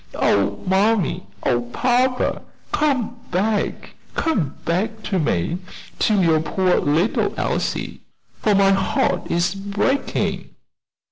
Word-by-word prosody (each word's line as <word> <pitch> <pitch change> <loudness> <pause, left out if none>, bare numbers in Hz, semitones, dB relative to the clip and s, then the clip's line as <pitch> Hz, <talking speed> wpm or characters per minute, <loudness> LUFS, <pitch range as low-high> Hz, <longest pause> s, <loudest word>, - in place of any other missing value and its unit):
Oh, 100 0 +2
mammy! 190 - +1 0.2
Oh, 120 -1 +2
papa! 250 - +1 0.3
come 260 -6 0
back, 205 +4 -1 0.2
come 185 - 0
back 215 +6 -1
to 195 -3 -1
me 150 - 0 0.4
to 215 -2 +3
your 165 -4 +4
poor 180 +4 +1
little 160 +9 +1
Elsie, - - -2 0.4
for 210 -2 +2
my 195 0 +5
heart 190 -2 +1
is 175 +2 +1
breaking." 200 +7 -1
195 Hz, 110 wpm, -21 LUFS, 170-220 Hz, 0.4 s, my